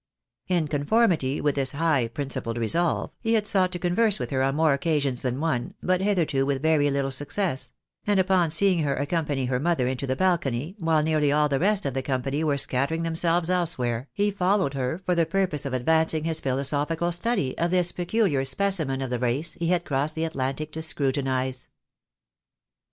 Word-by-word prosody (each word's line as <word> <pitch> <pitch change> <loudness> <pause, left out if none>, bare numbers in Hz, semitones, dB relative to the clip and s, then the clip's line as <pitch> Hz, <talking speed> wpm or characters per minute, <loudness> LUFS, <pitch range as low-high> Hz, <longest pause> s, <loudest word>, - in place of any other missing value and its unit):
In 175 -4 +1
conformity 150 - +1
with 145 -1 +1
this 135 -2 0
high 145 -5 +1
principled 120 -2 -4
resolve, 165 +10 0
he 230 -1 +1
had 215 -2 +1
sought 185 -3 +2
to - - -2
converse 195 +4 +1
with - - -5
her 130 -1 0
on 135 +1 +1
more 155 -1 +3
occasions 140 -3 0
than 125 0 -2
one, 150 -7 -2
but 185 0 +1
hitherto 170 -9 +1
with 135 0 -1
very 155 -2 +3
little 140 -1 -1
success; 135 -2 -2 0.4
and, 205 -2 +3
upon 185 -3 +3
seeing 180 +2 +2
her 145 -3 0
accompany 145 -2 -1
her 125 0 -1
mother 145 -4 +1
into 130 +1 -3
the 130 - 0
balcony, 160 -2 0
while 160 -3 +2
nearly 155 -2 +2
all 150 +1 +3
the 140 -2 0
rest 205 +1 +1
of 135 - -1
the 135 - -1
company 135 +3 -2
were 145 -3 +1
scattering 140 +5 +1
themselves 165 +1 +1
elsewhere, 135 -9 -1
he 205 0 0
followed 190 -5 +1
for 155 +8 -2
the 170 -1 +3
purpose 180 -7 -1
of 135 - -5
advancing 160 +4 +1
his 160 -1 -2
philosophical 145 +6 -1
study 175 - 0
of 170 - +1
this 175 -1 +2
pecuUar 175 -6 0
specimen 160 -10 0
of 130 - -5
the 125 - -1
race 125 +7 0
he 170 - -1
had 175 0 +1
crossed 140 +2 -1
the 160 0 -1
Atlantic 145 0 -3
to 160 - -5
scrutinise. 130 -4 -1
155 Hz, 185 wpm, -25 LUFS, 135-175 Hz, 0.4 s, more